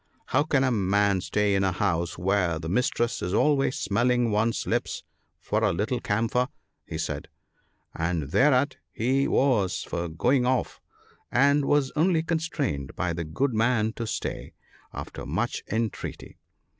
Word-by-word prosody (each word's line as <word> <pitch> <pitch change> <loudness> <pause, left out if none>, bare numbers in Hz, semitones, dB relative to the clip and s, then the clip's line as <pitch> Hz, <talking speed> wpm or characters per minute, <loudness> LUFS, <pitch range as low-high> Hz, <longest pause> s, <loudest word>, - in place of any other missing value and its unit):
" - - -38
How 130 - +5
can 145 -3 +2
a 130 - +2
man 100 -2 +2
stay 105 +2 +1
in 95 0 +2
a 95 - +2
house 85 -3 -1
where 90 -2 +1
the 80 0 -6
mistress 120 +4 0
is 90 +3 -1
always 135 0 +2
smelling 120 +3 +1
one's 110 +2 +1
lips - - -2 0.4
for - - -1
a - - +3
little 110 +9 -1
camphor? 115 +5 0 0.2
" - - -52
he - - -4
said; - - -3 0.7
and 80 -4 -2
thereat 140 - +3
he 130 +5 +1
was 115 -9 +2
for 85 0 -3
going 125 - +2
off, 130 0 0 0.5
and 140 +3 +4
was 145 -2 +2
only 160 +1 +3
constrained 155 - -2
by 85 -1 -1
the 85 0 -3
good 120 - -1
man 110 -1 +2
to 115 -2 -5
stay, - - -4 0.4
after - - -7
much - - -2
entreaty. 110 0 -4
115 Hz, 155 wpm, -26 LUFS, 95-130 Hz, 0.7 s, How